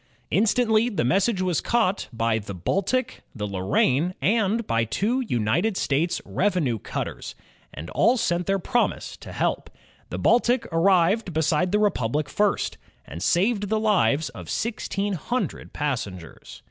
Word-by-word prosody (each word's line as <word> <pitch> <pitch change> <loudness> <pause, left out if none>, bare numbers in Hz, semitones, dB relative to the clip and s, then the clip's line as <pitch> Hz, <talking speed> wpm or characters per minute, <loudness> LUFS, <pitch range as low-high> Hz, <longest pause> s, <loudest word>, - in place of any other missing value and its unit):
Instantly 220 +4 +3
the 205 - -1
message 195 - +2
was 180 -4 0
caught 220 -5 +1
by 115 -1 0
the 100 -2 -7
Baltic, 195 - -1
the 105 -3 -3
Lorraine, 125 - +1
and 215 - +1
by 115 - +1
two 215 - 0
United 165 - 0
States 155 +5 0
revenue 175 - 0
cutters, - - -5 0.4
and 80 - -8
all 245 +3 +3
sent 175 -5 0
their 195 0 +2
promise 240 +6 -1
to - - -11
help. - - -1 0.4
The - - -4
Baltic 245 +1 +3
arrived 180 +3 +3
beside 160 +3 +1
the 210 - +3
Republic 150 - 0
first, 205 +7 0 0.3
and 85 - -8
saved 205 - +1
the 220 0 +1
lives 180 - +2
of 120 - -10
sixteen 205 -3 -2
hundred 245 +8 -3
passengers. 100 - -5
185 Hz, 140 wpm, -24 LUFS, 135-215 Hz, 0.4 s, Instantly